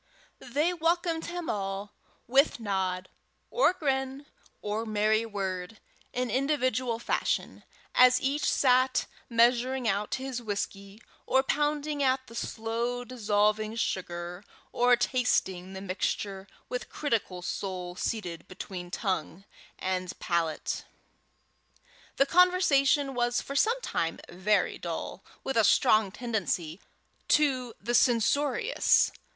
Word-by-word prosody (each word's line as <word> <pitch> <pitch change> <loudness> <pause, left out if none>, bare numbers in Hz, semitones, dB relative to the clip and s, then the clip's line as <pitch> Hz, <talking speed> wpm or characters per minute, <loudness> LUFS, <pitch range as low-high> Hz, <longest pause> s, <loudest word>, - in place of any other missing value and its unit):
They 300 +8 0
welcomed 335 0 0
him 345 -1 -5
all, 195 0 -3 0.3
with 270 +2 +3
nod, 190 -3 -2 0.4
or - - +4
grin, 270 -5 -2 0.3
or 210 +2 -2
merry 215 +1 +1
word, 195 -1 -4 0.3
in 250 0 -2
individual 255 -4 0
fashion, 235 - -1 0.3
as 250 0 +6
each 280 +3 0
sat 255 -1 +3 0.2
measuring 245 +2 +3
out 205 0 0
his 265 -2 -4
whisky, 200 -1 -5 0.2
or 265 0 +3
pounding 295 +1 0
at 260 -1 +2
the 230 - -14
slow 230 +2 -3
dissolving 215 -2 +1
sugar, 175 -4 -3 0.3
or 245 0 +4
tasting 195 -7 0
the 190 - -6
mixture 195 +1 -3 0.2
with 250 0 -4
critical 220 -10 -2
soul 180 -2 -4
seated 180 -6 -4
between 185 -1 -7
tongue 185 -1 -3 0.3
and 185 -1 -3
palate. 165 -2 -1 1.3
The 275 - +4
conversation 290 -5 +4
was 240 -1 +1
for 275 - -6
some 460 - +3
time 165 - -2
very 185 +2 0
dull, 170 +2 -5 0.2
with 270 - -2
a 225 - +5
strong 215 0 +4
tendency 195 -7 -2 0.5
to 255 -6 +2
the 235 +5 -3
censorious. 260 - +3
230 Hz, 110 wpm, -29 LUFS, 195-265 Hz, 1.3 s, as